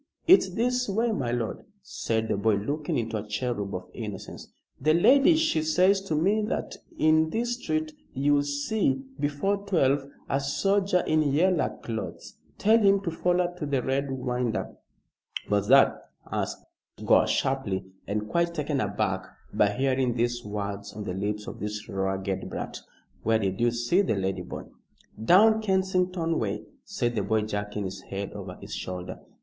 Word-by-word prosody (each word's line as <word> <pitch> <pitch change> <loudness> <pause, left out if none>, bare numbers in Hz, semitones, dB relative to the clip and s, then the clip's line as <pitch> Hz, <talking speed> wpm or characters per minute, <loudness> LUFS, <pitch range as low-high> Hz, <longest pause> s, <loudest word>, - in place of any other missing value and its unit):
"It's 350 - +6
this 250 +1 +1
way, 225 +4 +1
my 130 - -1
lord," 120 -2 -2 0.2
said 110 -10 -2
the - - 0
boy, 105 +1 +2
looking 120 +2 -2
like 110 -2 -3
a - - -15
cherub 105 -2 -2
of 90 0 -6
innocence. 105 -5 -7 0.3
"The 155 +4 +3
lady, 275 - +6
she 315 - +2
says 180 +5 +3
to 160 - -1
me 195 +8 +2
that 220 - -3 0.2
in 155 0 +4
this 235 +5 -1
street 155 0 -1 0.2
you'll 145 +2 +2
see, 205 - 0 0.2
before 150 +8 0
twelve, 145 -9 +1 0.2
a 135 - +1
soldier 190 +6 +1
in 155 0 +3
yeller 155 +4 +2
clothes. 110 -2 -5 0.2
Tell 220 +3 +4
him 200 -2 +4
to 175 -4 -3
foller 175 +1 +1
to 155 - -2
the 135 -3 0
Red 135 +1 0
Winder." 125 -3 -2 0.7
"What's 105 0 +1
that?" 135 +3 +4 0.2
asked - - -3 0.4
Gore, - - +5
sharply, 120 -9 0 0.2
and 105 +1 -2
quite 170 +8 0
taken 150 -3 -1
aback 100 -1 -1 0.3
by 105 - +4
hearing 130 +2 +1
these 120 0 0
words 100 -1 -5
on 105 - -6
the 95 - -4
lips 105 +2 -3
of - - -8
this 105 +1 -5
ragged 95 0 -2
brat. - - -5 0.4
"Where 110 +1 +3
did 95 -1 -2
you 120 - +4
see 120 +11 +2
the 185 - 0
lady, 95 -1 -1
boy?" - - -7 0.6
"Down 220 - +6
Kensington 185 -4 +1
way," 105 -1 -2 0.2
said 120 -12 -1
the 110 - 0
boy 110 +2 +1
jerking 105 -1 -3
his 95 +1 -6
head 100 0 -5
over - - -7
his - - -9
shoulder. 90 -1 -5
135 Hz, 165 wpm, -27 LUFS, -, 0.7 s, It's